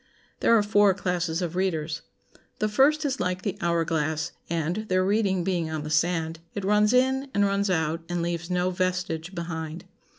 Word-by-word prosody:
There 230 - +5
are 210 - +3
four 205 -2 +4
classes 180 -2 -1
of 175 0 -3
readers. 165 -4 -1 0.6
The 215 - +1
first 280 +8 +3
is 275 -1 -1
like 180 0 -1
the 200 -2 -2
hour 170 -2 +1
glass, 160 0 -1 0.2
and, 170 +2 -1
their 185 0 +2
reading 195 -3 +1
being 170 -3 -1
on 155 -1 -3
the 150 - -5
sand, 165 0 +1 0.2
it 200 -2 -3
runs 210 +1 +4
in 265 +2 +2
and 205 0 +4
runs 200 0 +1
out, 160 -2 0
and 175 -1 -1
leaves 170 0 -3
no 180 0 +1
vestige 185 -1 -2
behind. 165 -1 -5
180 Hz, 185 wpm, -26 LUFS, 165-200 Hz, 0.6 s, There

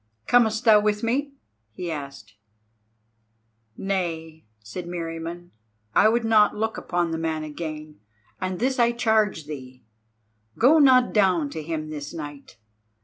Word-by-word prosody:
"Comest 230 -1 +3
thou 215 -2 +7
with 210 0 0
me?" 275 +5 -1 0.4
he 175 +4 -5
asked. 140 -8 -8 1.4
"Nay," 165 -5 -3
said 110 +12 -8
Meriamun, 170 0 -6 0.4
"I 215 - +5
would 230 +1 +1
not 215 -2 +4
look 220 +1 -2
upon 175 -1 -2
the 160 - -2
man 160 -1 -2
again; 155 -1 -7 0.4
and 185 0 -3
this 255 +4 0
I 235 0 +4
charge 220 -8 +1
thee. 130 -4 -9 0.7
Go 290 +7 +5
not 255 -3 +5
down 180 -8 +2
to 160 - -5
him 155 0 -4
this 145 +1 -7
night. 145 -3 -9
175 Hz, 135 wpm, -24 LUFS, 155-220 Hz, 1.4 s, thou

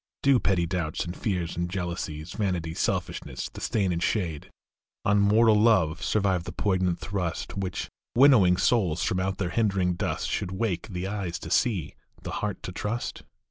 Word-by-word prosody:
Do 135 -2 +5
petty 95 -5 +1
doubts 85 -3 -2
and 85 +1 -5
fears 90 -7 -2
and 85 0 -2
jealousies, 85 -3 -4
Vanity, 90 -6 -2
selfishness, - - -2
the - - -8
stain 100 -4 +1
and 85 -1 -1
shade 85 -7 -1 0.6
On 100 +1 +4
mortal 110 +2 +5
love, 95 -7 +3
survive 95 -3 +1
the 85 - -5
poignant 90 -1 0
thrust 90 -4 -3
Which, 95 -2 -3 0.3
winnowing 120 -9 +6
souls 95 -5 +2
from 90 - 0
out 95 +1 -1
their 90 -3 -2
hindering 95 -5 +1
dust, 90 +2 -2
Should 90 - -2
wake 95 -3 -1
the 90 -3 -4
eyes 95 -4 -3
to 80 - -8
see, 105 - +1 0.3
the - - -5
heart 105 -2 -3
to - - -5
trust 105 +6 -3
95 Hz, 170 wpm, -27 LUFS, 85-105 Hz, 0.6 s, winnowing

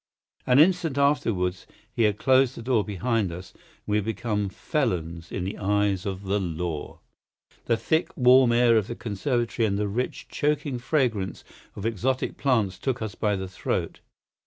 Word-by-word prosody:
An 125 - +5
instant 165 -2 +4
afterwards 100 -11 +1 0.3
he 115 - +2
had 105 -1 +1
closed 130 0 +3
the 115 - -8
door 120 -3 +2
behind 105 -1 -1
us, 90 +2 -8
and - - -26 0.2
we 105 0 +1
had 105 - -1
become 105 -2 -2
felons 85 - -2
in 95 - -3
the 95 +3 -5
eyes 100 -1 +1
of 95 0 -4
the 100 +1 0
law. 85 -3 -4 0.6
The 115 - +2
thick, 160 +8 0
warm 125 -1 +6
air 120 -1 +5
of 105 -2 0
the 120 - -5
conservatory 115 +1 -1
and 100 -1 -1
the 105 0 0
rich, 120 +6 -3
choking 145 -3 -1
fragrance 120 -8 -1 0.3
of 100 - -6
exotic 120 +4 -1
plants 110 -9 +1
took 130 +2 -1
us 110 -3 -4
by 105 0 0
the 95 0 -4
throat. 90 - -3
110 Hz, 170 wpm, -26 LUFS, 95-125 Hz, 0.6 s, warm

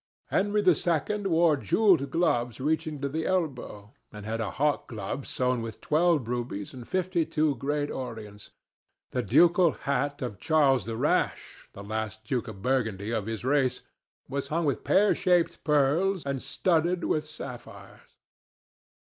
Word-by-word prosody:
Henry 205 +1 +1
II. 180 +4 +1
wore 165 -3 +4
jewelled 145 - +3
gloves 125 -7 0
reaching 155 +1 -1
to 140 - 0
the 160 +3 -3
elbow, 130 - -3 0.2
and 105 -1 -9
had 115 +1 -2
a 105 - -2
hawk 150 +1 0
glove 115 +3 -5
sewn 125 -1 0
with 115 -1 -7
twelve 155 -5 +2
rubies 120 -4 -4
and 125 -3 -10
fifty 185 -2 0
two 155 -1 +1
great 145 +3 -2
orients. 110 -5 -7 0.6
The - - 0
ducal 165 - +4
hat 140 +1 -2
of 110 -6 -5
Charles 135 - +3
the 115 -1 -3
Rash, - - -1
the 100 - -9
last 110 +1 -4
Duke 125 +1 -2
of 100 -3 -9
Burgundy 110 -5 0
of 110 -3 -2
his 115 +1 -4
race, 130 -2 +1 0.5
was 140 0 -3
hung 165 +2 -1
with 140 -4 -1
pear 205 +2 +4
shaped 180 -3 +1
pearls 155 +5 +2
and 140 -2 -2
studded 175 0 0
with 155 - 0
sapphires. 140 -5 -11
140 Hz, 150 wpm, -27 LUFS, 115-165 Hz, 0.6 s, wore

